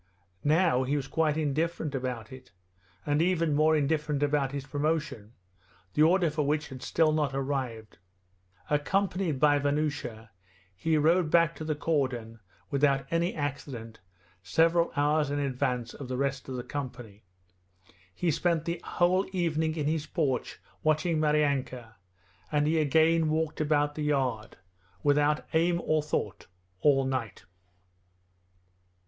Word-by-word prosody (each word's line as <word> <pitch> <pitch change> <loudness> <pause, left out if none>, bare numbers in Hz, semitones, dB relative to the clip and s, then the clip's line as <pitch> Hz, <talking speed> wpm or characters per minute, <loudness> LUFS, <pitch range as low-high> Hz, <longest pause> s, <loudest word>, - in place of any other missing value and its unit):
Now 155 -3 +3
he 135 +3 0
was 140 -3 -2
quite 155 0 +1
indifferent 155 0 -1
about 125 -4 -4
it, 130 -4 -12 0.5
and 145 +1 +1
even 165 -3 +1
more 155 +2 +4
indifferent 150 -1 0
about 145 -2 +1
his 140 -1 -5
promotion, 145 -8 -2 0.6
the 150 - +1
order 170 +1 +4
for 155 0 -1
which 150 +1 -1
had 130 -2 -9
still 160 -1 +2
not 150 -3 0
arrived. 130 -6 -3 0.7
Accompanied 180 +1 0
by 145 0 +4
Vanyusha 140 -7 -2 0.4
he 155 - +1
rode 165 +2 +3
back 165 0 +3
to - - -6
the 155 -1 -1
cordon 130 -8 -2 0.3
without 140 -1 +2
any 170 +1 0
accident 135 -6 -5 0.4
several 165 - +2
hours 150 +1 +2
in 145 - -1
advance 130 -4 -1
of 140 - -8
the 130 0 -3
rest 135 -1 -2
of 130 - -4
the 125 - -4
company. 120 -6 -7 0.9
He 170 - 0
spent 165 +1 0
the 170 0 -3
whole 185 +2 +1
evening 160 -3 0
in 150 -3 -2
his 155 0 -1
porch 140 -7 -2 0.2
watching 155 +1 +1
Maryanka, 140 -6 0 0.6
and 150 -1 +2
he 160 +1 +2
again 160 +2 +3
walked 155 0 -1
about 145 -1 +1
the 155 - -5
yard, 130 -7 -1 0.5
without 145 +1 +2
aim 170 +2 +2
or 155 0 +2
thought, 145 -9 -3 0.3
all 135 -2 +4
night. 130 -5 -3
150 Hz, 140 wpm, -28 LUFS, 135-160 Hz, 0.9 s, more